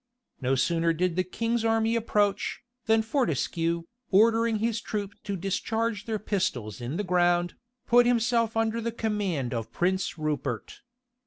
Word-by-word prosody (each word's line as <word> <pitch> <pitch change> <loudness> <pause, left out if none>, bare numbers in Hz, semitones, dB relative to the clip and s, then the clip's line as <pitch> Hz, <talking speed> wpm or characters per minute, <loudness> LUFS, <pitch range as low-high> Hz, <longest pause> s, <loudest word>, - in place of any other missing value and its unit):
No 130 +1 +2
sooner 165 +5 +2
did 175 +1 0
the 185 - +2
king's 230 +5 -1
army 225 0 +2
approach, 210 -3 0 0.3
than 220 0 +4
Fortescue, 170 - 0 0.3
ordering 225 +3 +4
his 225 +1 -1
troop 205 -3 -4
to 200 -1 -2
discharge 210 +3 -2
their 220 -1 -1
pistols 125 - -2
in 125 +7 -3
the 205 - -1
ground, 175 -1 +2 0.3
put 245 0 +5
himself 230 -1 +2
under 225 +1 +1
the 230 +1 -2
command 205 - -2
of 115 -2 -4
Prince 185 0 0
Rupert. 150 -7 -3
205 Hz, 145 wpm, -27 LUFS, 170-225 Hz, 0.3 s, put